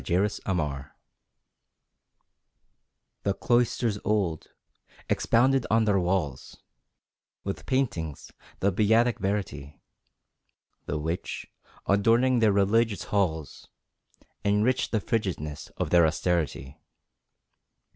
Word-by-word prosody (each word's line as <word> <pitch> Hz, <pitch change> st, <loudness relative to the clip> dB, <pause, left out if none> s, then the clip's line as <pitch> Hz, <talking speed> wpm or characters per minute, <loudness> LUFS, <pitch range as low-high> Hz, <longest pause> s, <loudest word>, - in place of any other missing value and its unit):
The 75 Hz, -, -3 dB
Evil 95 Hz, 0 st, 0 dB
Monk 70 Hz, -5 st, -2 dB, 2.4 s
The 100 Hz, -1 st, 0 dB
cloisters 120 Hz, -3 st, +1 dB
old, 95 Hz, -7 st, 0 dB, 0.6 s
expounded 130 Hz, +2 st, +2 dB
on 110 Hz, 0 st, +3 dB
their 100 Hz, -2 st, +3 dB
walls 85 Hz, -7 st, -2 dB, 0.9 s
With 100 Hz, -, -5 dB
paintings, 90 Hz, -, -2 dB, 0.3 s
the 100 Hz, -, +3 dB
Beatic 110 Hz, +3 st, +3 dB
Verity, 95 Hz, -8 st, -3 dB, 1.1 s
The -, -, -2 dB
which 80 Hz, +4 st, -4 dB, 0.4 s
adorning 115 Hz, +5 st, +3 dB
their 110 Hz, -2 st, +4 dB
religious 100 Hz, +2 st, +2 dB
halls, 80 Hz, -7 st, -2 dB, 0.8 s
Enriched 105 Hz, +5 st, +2 dB
the 110 Hz, -, +1 dB
frigidness 85 Hz, -11 st, -3 dB
of -, -, -2 dB
their 85 Hz, -2 st, +6 dB
Austerity. 80 Hz, -3 st, -2 dB
100 Hz, 90 wpm, -27 LUFS, 80-110 Hz, 2.4 s, their